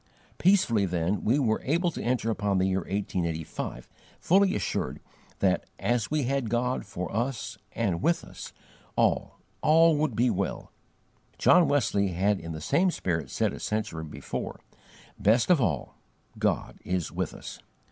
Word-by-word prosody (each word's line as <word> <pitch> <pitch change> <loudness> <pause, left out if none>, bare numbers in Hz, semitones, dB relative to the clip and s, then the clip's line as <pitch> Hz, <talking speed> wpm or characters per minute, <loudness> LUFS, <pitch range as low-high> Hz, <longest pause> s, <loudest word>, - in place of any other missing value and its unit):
Peacefully, 145 - +3
then, 90 +3 -1
we 120 +6 +3
were 115 -6 +1
able 170 +5 +1
to - - -6
enter 120 -2 0
upon 105 -3 0
the 95 - +2
year 95 0 +1
1885, 85 -4 -3 0.3
fully 190 +2 +3
assured - - -2 0.4
that, - - +2
as 120 -3 0
we 150 -1 +1
had 135 -2 -1
God 125 +2 -1
FOR 90 +1 -5
us 120 0 -2 0.2
and 95 -7 -1
WITH 170 +7 +2
us, - - -9 0.4
ALL, - - +1 0.2
ALL 165 +1 +5
would 150 -6 0
be 120 +2 +3
well." 100 -2 -3 0.7
John 180 -3 +5
Wesley 130 -8 +2
had 100 +3 +1
in 80 0 -7
the 80 -1 -6
same 185 - +2
spirit 85 - -2
said - - 0
a - - -7
century 105 -7 -2
before, 75 - -6 0.6
"Best 110 - +3
of 165 -6 +5
all, 80 - -1 0.4
God - - -1
is 90 -2 -2
with - - -3
us." - - -9
110 Hz, 155 wpm, -28 LUFS, 95-140 Hz, 0.7 s, ALL